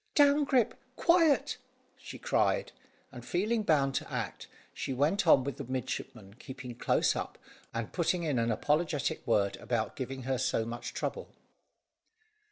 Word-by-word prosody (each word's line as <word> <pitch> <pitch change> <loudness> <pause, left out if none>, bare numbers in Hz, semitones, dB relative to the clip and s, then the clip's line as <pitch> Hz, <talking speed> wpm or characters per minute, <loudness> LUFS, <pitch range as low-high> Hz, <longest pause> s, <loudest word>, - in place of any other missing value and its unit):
"Down, 290 0 +5
Grip! 260 -5 +2 0.2
Quiet!" 335 -4 +3 0.4
she - - -10
cried, - - +1 0.4
and - - -9
feeling 215 +6 0
bound 145 -8 +2
to - - -3
act, - - -4 0.3
she 135 - -3
went 165 +8 +1
on, 135 -4 +7
with 140 +1 -4
the 140 - -5
midshipman 120 -5 -5
keeping 130 -2 -8
close 120 - +2
up, - - -4 0.3
and 115 -2 -4
putting 175 0 +1
in 145 -6 0
an 115 0 +1
apologetic 150 +4 0
word 100 -4 +2
about 115 -2 -2
giving 130 0 -5
her 130 0 -1
so 120 -3 0
much 120 +1 -6
trouble. 480 - -3
140 Hz, 150 wpm, -31 LUFS, 120-195 Hz, 0.4 s, on